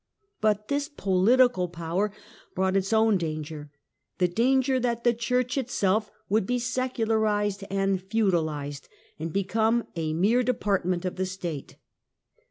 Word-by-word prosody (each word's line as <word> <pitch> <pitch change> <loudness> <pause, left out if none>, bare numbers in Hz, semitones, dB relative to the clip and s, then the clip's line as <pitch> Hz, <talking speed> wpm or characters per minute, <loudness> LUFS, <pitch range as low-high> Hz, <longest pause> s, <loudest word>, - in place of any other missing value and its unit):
But 210 -1 +1
this 285 +1 -1
political 200 - +3
power 170 +5 -2 0.4
brought 190 +1 +1
its 195 +1 0
own 220 -3 +4
danger, 155 -2 -5 0.5
the 180 - +3
danger 260 +7 +2
that 235 -1 -1
the 240 - +4
Church 250 +3 0
itself 215 -5 0 0.2
would 205 -1 +1
be 250 - +1
secularized 220 -5 0
and 195 -1 0
feudalized, 160 -9 -1 0.3
and 160 +1 -4
become 220 +5 +1
a 160 -2 -2
mere 205 +9 +3
depart 210 -7 0
ment 180 0 -1
of 185 - -3
the 185 0 -1
State. 175 -6 -6
205 Hz, 135 wpm, -26 LUFS, 180-235 Hz, 0.5 s, own